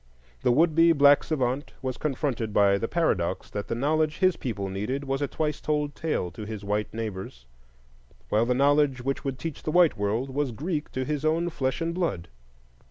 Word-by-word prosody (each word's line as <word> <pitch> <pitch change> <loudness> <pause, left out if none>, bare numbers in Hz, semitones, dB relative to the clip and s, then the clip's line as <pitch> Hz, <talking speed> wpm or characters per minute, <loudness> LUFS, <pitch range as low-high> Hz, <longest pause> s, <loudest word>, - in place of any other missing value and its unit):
The - - +3
would 160 +5 +4
be 165 +1 +6
black 145 -1 +6
savant 135 -2 -2
was 130 -1 -3
confronted 130 -6 -2
by 100 -1 +4
the 115 - -1
paradox 95 - 0
that 105 -1 -4
the - - -2
knowledge 155 +4 +1
his 185 -2 +3
people 100 -6 -4
needed 105 +9 -3
was 135 0 -2
a 145 - +1
twice 150 0 -2
told 150 -1 -1
tale 150 - -2
to 100 +6 -8
his 105 -1 -6
white 105 +1 -1
neighbors, 95 - -6 0.8
while 110 +2 +2
the 125 - +2
knowledge 140 -1 +3
which 135 +1 -2
would 135 -2 -3
teach 150 +3 -6
the - - -4
white 170 -6 +4
world 110 +6 -1
was 140 -2 -1
Greek 150 - -3
to 130 0 -2
his 150 0 -2
own 165 +2 +1
flesh 130 -1 -2
and 165 0 -1
blood. 170 - -2
135 Hz, 195 wpm, -26 LUFS, 110-155 Hz, 0.8 s, be